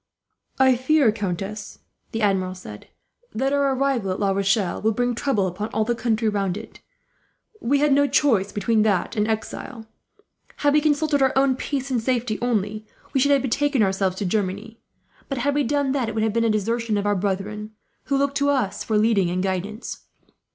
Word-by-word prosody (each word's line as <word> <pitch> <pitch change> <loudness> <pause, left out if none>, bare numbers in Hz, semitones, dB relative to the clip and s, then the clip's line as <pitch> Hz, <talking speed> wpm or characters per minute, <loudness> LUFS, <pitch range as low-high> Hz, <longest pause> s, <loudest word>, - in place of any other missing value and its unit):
"I 260 -1 +5
fear, 260 -1 +3
countess," 205 0 -5 0.3
the 225 -1 -2
Admiral 185 -2 +1
said, 105 - -11 0.5
"that 270 +4 0
our 280 -1 +2
arrival 260 -7 0
at 185 - -2
La 200 -1 +1
Rochelle 195 -1 0
will 220 +1 +2
bring 245 +2 0
trouble 230 -5 0
upon 190 +4 -4
all 220 - +2
the 240 - +1
country 225 -1 0
round 200 -3 0
it. 220 - -10 0.8
We 280 +2 +1
had 295 -1 +4
no 285 +1 +4
choice 220 -10 +2
between 215 +2 +1
that 205 0 +1
and 210 -1 +1
exile. 225 +1 -4 0.7
Had 290 -1 +2
we 300 - +4
consulted 295 -1 +1
our 265 - +3
own 270 -1 +3
peace 270 0 -3
and 245 -3 +1
safety 240 -2 -1
only, 215 -3 -1 0.3
we 270 - +2
should 280 +2 +3
have 280 -1 +3
betaken 275 -1 +1
ourselves 190 -1 0
to 200 - -3
Germany; 205 +3 -2 0.5
but 275 - -2
had 280 +4 0
we 290 - +1
done 280 +1 0
that, 260 -5 0
it 225 - -6
would 220 - +1
have 220 -1 0
been 230 0 +1
a - - +3
desertion 220 +1 0
of 205 - -2
our 205 0 +2
brethren, 205 +3 -3 0.3
who 275 - +1
look 280 0 +1
to 280 0 +1
us 255 -9 0
for 220 - 0
leading 210 -4 +3
and 180 +1 -1
guidance. 195 +4 -4
225 Hz, 195 wpm, -23 LUFS, 205-270 Hz, 0.8 s, I